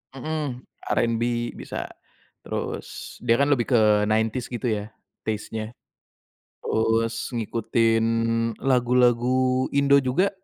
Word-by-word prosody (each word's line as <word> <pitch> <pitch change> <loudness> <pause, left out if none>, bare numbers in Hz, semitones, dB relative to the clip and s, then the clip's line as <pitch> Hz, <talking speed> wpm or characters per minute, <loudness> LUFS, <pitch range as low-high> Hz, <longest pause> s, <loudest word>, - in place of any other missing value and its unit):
Mmm, 140 -2 -4 0.2
R&B 120 0 0
bisa, - - -6 0.5
terus - - -6
dia 115 -1 +2
kan 140 +3 +2
lebih 125 -5 +2
ke - - +6 0.3
90s 110 +3 0
gitu, 120 0 -4
ya, 105 -1 -2 0.4
taste-nya 110 +1 -4 0.9
terus 115 +2 0
ngikutin 115 0 +1 0.6
lagu-lagu 125 0 +2
Indo 140 0 +5
juga, 140 +9 +2
120 Hz, 100 wpm, -24 LUFS, 115-130 Hz, 0.9 s, ke